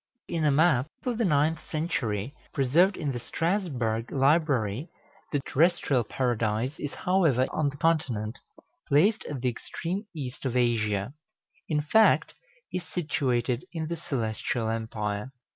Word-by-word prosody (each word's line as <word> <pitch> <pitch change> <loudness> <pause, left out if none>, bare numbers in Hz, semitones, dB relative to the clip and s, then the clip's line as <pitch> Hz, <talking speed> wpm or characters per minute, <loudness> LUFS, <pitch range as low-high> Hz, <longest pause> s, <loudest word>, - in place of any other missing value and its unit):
In 165 -2 -1
a 150 - +4
map 145 -3 +4 0.2
of 245 -2 -1
the 230 - +3
ninth 155 -1 +2
century, 135 - -2 0.2
preserved 165 +9 +3
in 150 -4 -1
the 120 - -4
Strasbourg 130 - -1
library, 135 - +2 0.4
the 145 - 0
terrestrial 150 -4 +2
Paradise 115 +1 0
is, 145 - -3
however, 165 -9 +3
on 150 -2 +1
the 140 - -9
Continent, 130 -9 0 0.5
placed 195 +10 +4
at 140 -4 -5
the 125 - +2
extreme 180 - -5
east 135 -3 -6
of 130 -2 0
Asia; 110 -2 +1 0.6
in 150 -1 +2
fact, 220 +9 +4 0.4
is 180 - -1
situated 130 -8 -1
in 160 -2 -3
the 170 - -1
Celestial 115 -5 -2
Empire. 110 -1 -3
140 Hz, 135 wpm, -28 LUFS, 120-165 Hz, 0.6 s, a